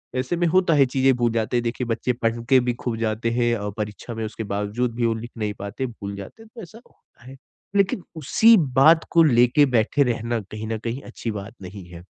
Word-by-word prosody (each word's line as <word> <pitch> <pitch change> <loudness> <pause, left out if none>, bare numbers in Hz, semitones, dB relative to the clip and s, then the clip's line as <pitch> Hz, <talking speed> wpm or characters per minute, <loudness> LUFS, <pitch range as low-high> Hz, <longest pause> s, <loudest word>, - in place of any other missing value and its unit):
ऐसे 130 +6 -1
में 175 - +1
होता 180 0 +3
है 140 -2 +5
चीज़ें 130 +1 +2
भूल 120 -1 +1
जाते 115 +1 0
हैं। 120 - 0
देखिए 120 +1 -3
बच्चे 120 +2 -1
पढ़ 115 -1 -2
के 130 - +6
भी 125 0 -1
खूब 120 -3 -2
जाते 115 +1 -1
हैं 120 0 +1
और 105 0 -4
परीक्षा 105 +2 -5
में 110 0 -3
उसके 110 +1 -6
बावजूद 105 +4 -2
भी 120 0 0
वो 115 - +2
लिख 115 +2 -8
नहीं 105 -1 -2
पाते 100 +6 -4
भूल 100 -3 -7
जाते 100 - -10
हैं 225 - -18
तो 230 - -8
ऐसा 185 +3 -12
होता - - -28
है। 130 +1 -11 0.4
लेकिन 195 -2 +1
उसी 225 +8 +5 0.2
बात 160 +4 +6
को 165 - +6
लेके 125 0 +4
बैठे 115 +6 +3
रहना 120 -2 -1
कहीं 110 +1 -6
न 110 0 -2
कहीं 120 +4 -3
अच्छी 120 -2 -6
बात 105 +1 -7
नहीं 95 0 -9
है। 85 -1 -11
120 Hz, 230 wpm, -23 LUFS, 110-135 Hz, 0.4 s, के